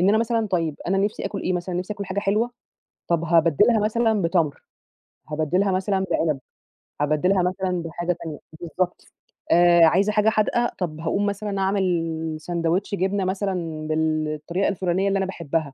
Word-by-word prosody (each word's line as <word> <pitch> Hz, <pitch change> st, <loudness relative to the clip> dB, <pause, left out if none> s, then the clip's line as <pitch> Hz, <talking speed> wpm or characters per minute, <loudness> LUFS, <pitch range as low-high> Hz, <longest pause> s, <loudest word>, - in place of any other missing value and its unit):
إن 185 Hz, -, +4 dB
أنا 215 Hz, +2 st, +4 dB
مثلًا 230 Hz, -1 st, 0 dB
طيب 165 Hz, -6 st, -1 dB
أنا 195 Hz, +2 st, +1 dB
نفسي 205 Hz, +2 st, -1 dB
آكل 200 Hz, -, -4 dB
إيه 185 Hz, -, 0 dB
مثلًا؟ 180 Hz, 0 st, -3 dB
نفسي 185 Hz, +4 st, -2 dB
آكل 200 Hz, -1 st, -5 dB
حاجة 195 Hz, +1 st, -2 dB
حلوة، 215 Hz, +4 st, +1 dB, 0.6 s
طب 170 Hz, -1 st, +1 dB
هابدلها 170 Hz, -, +4 dB
مثلًا 220 Hz, 0 st, +1 dB
بتمر، 165 Hz, -4 st, 0 dB, 0.7 s
هابدلها 160 Hz, +6 st, +1 dB
مثلًا 190 Hz, +1 st, 0 dB
بعنب، 155 Hz, -5 st, +1 dB, 0.6 s
هابدلها 175 Hz, +6 st, +2 dB
مثلًا 180 Hz, -1 st, -1 dB
بحاجة 170 Hz, +2 st, -2 dB
تانية 155 Hz, -3 st, -6 dB, 0.2 s
بالضبط 180 Hz, +1 st, -3 dB, 0.5 s
آآ 175 Hz, 0 st, +6 dB
عايزة 195 Hz, +6 st, +3 dB
حاجة 210 Hz, +1 st, +3 dB
حادقة، 230 Hz, +2 st, +1 dB
طَب 160 Hz, -4 st, -3 dB
هاقوم 170 Hz, +5 st, 0 dB
مثلًا 205 Hz, 0 st, -2 dB
أعمل 165 Hz, -5 st, 0 dB
ساندوتش 170 Hz, +4 st, -1 dB
جبنة 195 Hz, +1 st, 0 dB
مثلًا 180 Hz, -5 st, -2 dB
بالطريقة 155 Hz, +2 st, -1 dB
الفلانية 190 Hz, 0 st, 0 dB
اللي 195 Hz, 0 st, +1 dB
أنا 195 Hz, -, 0 dB
باحبها، 160 Hz, -5 st, -3 dB
180 Hz, 155 wpm, -23 LUFS, 165-200 Hz, 0.7 s, آآ